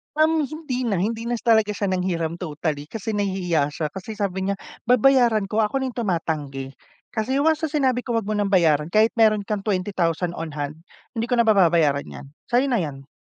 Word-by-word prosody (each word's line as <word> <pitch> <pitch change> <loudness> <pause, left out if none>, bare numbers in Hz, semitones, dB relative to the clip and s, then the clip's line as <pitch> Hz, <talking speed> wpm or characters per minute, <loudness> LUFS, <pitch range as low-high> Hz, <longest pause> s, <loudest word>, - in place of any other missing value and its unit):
Um, 310 -1 +3
hindi 260 -5 -4
na 210 - +1
hindi 225 +5 -2
na 240 - 0
s - - -8
talaga 220 -3 +3
siya 200 -2 -1
nanghiram 170 -3 -1
totally 150 -3 -3
kasi 220 +4 -5
nahihiya 185 -7 0
siya. 150 +1 -3
Kasi 195 +3 -7
sabi 190 -2 -2
niya 200 - 0 0.3
babayaran 245 -3 +4
ko, 210 +3 -2
ako 220 +5 +1
na 260 - -2
tumatanggi. 155 - -3 0.4
Kasi 235 +4 -1
once 320 0 +2
na - - -10
sinabi 260 -5 +1
ko 240 -1 -3
'wag 225 - +1
mo - - -1
ng 205 -1 0
bayaran, 155 -5 +3
kahit 215 +6 +3
meron 215 -2 +4
kang 210 +1 -2
20,000 185 -4 -1
on 160 -2 -6
hand, 145 +1 -4 0.3
hindi 230 -1 -3
ko 250 - +1
na 235 - +4
pababayaran 170 -9 +3
'yan. - - -9 0.2
Sa'yo 250 +3 +2
na 240 - +2
'yan. 140 -5 -5
205 Hz, 200 wpm, -23 LUFS, 165-235 Hz, 0.4 s, babayaran